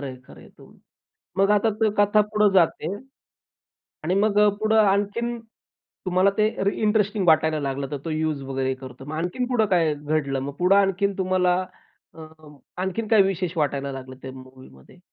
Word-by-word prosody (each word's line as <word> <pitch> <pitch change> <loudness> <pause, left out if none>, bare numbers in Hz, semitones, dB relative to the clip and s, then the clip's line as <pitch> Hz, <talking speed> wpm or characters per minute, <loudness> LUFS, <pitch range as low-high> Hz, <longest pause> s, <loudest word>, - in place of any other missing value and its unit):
खरं 140 - -5
आहे, 130 -1 -7
खरं - - -15
आहे, - - -16
तुम - - -18 0.6
मग 195 +1 +3
आता 210 +2 +3 0.3
कथा 205 +1 +4
पुढं 210 0 +2
जाते. 170 0 +2 1.1
आणि 180 +4 0
मग 210 -1 +2 0.2
पुढं 215 +1 +2
आणखीन 205 +4 0 0.7
तुम्हाला 185 +2 +3
ते 215 0 +3 0.2
री 200 - +1
इंटरेस्टिंग 210 -2 +1
वाटायला 160 0 +3
लागलं 135 0 -3
तर 145 - -3
तो 165 - -4
युज 155 -2 -2
वगैरे 135 0 -2
करतो. 130 0 -11
मग 150 +2 -7
आणखीन 180 +10 -2
पुढे 230 -4 +2
काय 165 -4 +2
घडलं? 145 -2 -2
मग 140 +1 -5
पुढं 185 +3 +4
आणखीन 200 0 +1
तुम्हाला 185 -1 +1 0.6
अं, 155 -2 -14 0.3
आणखीन 205 +4 -3
काय 215 -3 +6
विशेष 185 -2 -2
वाटायला 140 -2 -1
लागलं 130 -1 -9
त्या 130 - -7
मूव्हीमध्ये. 130 - -15
175 Hz, 165 wpm, -23 LUFS, 140-200 Hz, 1.1 s, काय